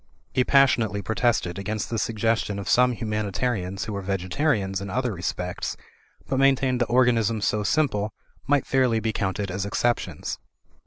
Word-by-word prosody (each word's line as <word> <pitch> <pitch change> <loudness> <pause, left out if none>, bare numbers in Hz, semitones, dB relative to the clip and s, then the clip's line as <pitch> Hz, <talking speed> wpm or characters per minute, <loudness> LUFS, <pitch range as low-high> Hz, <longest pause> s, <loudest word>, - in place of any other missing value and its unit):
He 130 - +3
passionately 120 -7 +3
protested 110 -4 0
against 105 +3 -3
the 115 - 0
suggestion 115 -2 0
of 100 - -6
some 125 0 +4
humanitarians 105 -3 -2
who 110 - -5
were 100 - -3
vegetarians 95 - -1
in 100 - -5
other 125 +2 -1
respects, 90 0 -3 0.5
but 135 - 0
maintained 135 -2 +3
that 120 - +2
organisms 115 -3 +3
so 105 - +1
simple 110 -5 +1 0.4
might 145 0 +2
fairly 130 -4 +2
be 110 0 -1
counted 100 -1 -2
as 95 +1 -2
exceptions. 120 +4 -1
110 Hz, 150 wpm, -25 LUFS, 100-125 Hz, 0.5 s, some